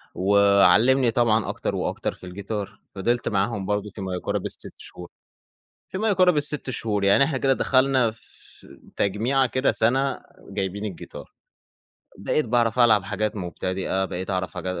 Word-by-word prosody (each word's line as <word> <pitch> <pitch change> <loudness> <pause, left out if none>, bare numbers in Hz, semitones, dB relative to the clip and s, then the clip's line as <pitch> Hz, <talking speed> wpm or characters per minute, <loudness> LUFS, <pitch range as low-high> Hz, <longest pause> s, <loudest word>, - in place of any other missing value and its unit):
وعلّمني 100 +6 +4
طبعًا 115 -2 +1
أكتر - - -3
وأكتر - - -3
في - - -14
الجيتار، 100 +2 -6 0.2
فضلت 120 +5 -1
معاهم 100 -1 -1
برضه 105 0 -2
في 100 - -10
ما 95 -1 -4
يقارب 90 - -3
ال6 - - -5
شهور، 90 -1 -11 0.8
في - - -6
ما 220 +2 0
يقارب 180 -4 +3
ال6 145 -2 +1
شهور 105 -4 -2
يعني 100 +8 +5
إحنا 140 -3 0
كده 135 0 +2
دخلنا 130 -3 +2
في 115 - -16 0.3
تجميعة 120 +7 +1
كده 130 +2 +1
سنة 130 +4 +1 0.3
جايبيِن 100 +2 -3
الجيتار، 95 -5 -9 0.8
بقيت 120 +8 -1
باعرف 120 0 +1
ألعب 110 -4 +5
حاجات 105 +2 -2
مُبتدئة، 95 +1 -3
بقيت 95 +2 -6
أعرِف 95 -3 -2
حاج - - -7
110 Hz, 150 wpm, -24 LUFS, 100-130 Hz, 0.8 s, يعني